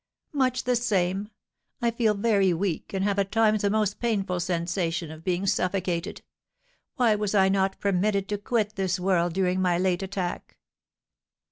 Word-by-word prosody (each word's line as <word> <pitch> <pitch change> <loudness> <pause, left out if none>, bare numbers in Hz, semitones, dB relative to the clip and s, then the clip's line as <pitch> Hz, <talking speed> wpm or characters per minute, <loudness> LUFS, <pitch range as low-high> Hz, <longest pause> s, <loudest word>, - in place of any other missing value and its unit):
"Much 260 -3 +1
the 250 0 +1
same; 200 -3 0 0.5
I 235 -1 +1
feel 225 -2 +1
very 200 -4 +2
weak, 180 -1 -2
and 195 -1 -1
have 200 0 +1
at 195 0 -1
times 215 -2 +3
a 200 - +3
most 210 -1 0
painful 200 -6 -1
sensation 170 -1 -2
of 160 0 -11
being 180 +2 -1
suffocated. 180 -3 -1 0.7
Why 240 -4 +3
was 210 -1 -1
I 190 -1 +5
not 195 0 0
permitted 200 0 +1
to 205 -1 -2
quit 215 0 -1
this 190 -2 -1
world 180 -2 +1
during 185 0 +1
my 180 -2 +2
late 180 0 +1
attack?" 190 -2 -4
195 Hz, 160 wpm, -26 LUFS, 180-210 Hz, 0.7 s, I